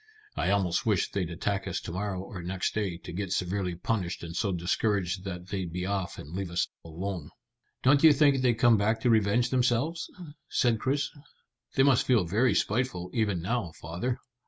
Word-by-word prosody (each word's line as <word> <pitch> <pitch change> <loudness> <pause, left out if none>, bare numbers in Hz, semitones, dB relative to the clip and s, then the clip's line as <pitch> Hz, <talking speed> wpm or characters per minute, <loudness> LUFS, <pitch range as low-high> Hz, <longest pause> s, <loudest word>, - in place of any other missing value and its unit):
I - - 0
almost 95 -4 +1
wish 105 -5 +1
they'd 90 -4 -1
attack 100 +4 -2
us 95 - -2
to - - -6
morrow 95 +1 -3
or 95 -2 -8
next 90 +1 -2
day, 100 -5 -1
to 85 - -9
get 95 0 -3
severely 90 -1 -1
punished 90 -1 -2
and 85 0 -6
so 100 0 0
discouraged 90 +1 0
that 90 -1 -6
they'd 95 -4 -3
be 90 +1 -3
off 95 -2 -2
and 75 +4 -8
leave 95 -2 -3
us 85 0 0 0.2
alone." 85 0 -5 0.5
"Don't 140 +3 +5
you 160 - +10
think 140 -2 +4
they'd 125 -2 +3
come 120 -1 +5
back 110 +2 +1
to 120 - +3
revenge 110 +3 +3
themselves?" 130 +6 +1 0.4
said 120 -4 +2
Chris. 140 +4 0 0.6
"They 135 - +5
must 135 -3 +4
feel 120 -8 +4
very 110 +9 +2
spiteful 105 -6 0
even 105 -8 0
now, 105 -5 -1
father." 90 +11 -3
100 Hz, 185 wpm, -29 LUFS, 90-120 Hz, 0.6 s, you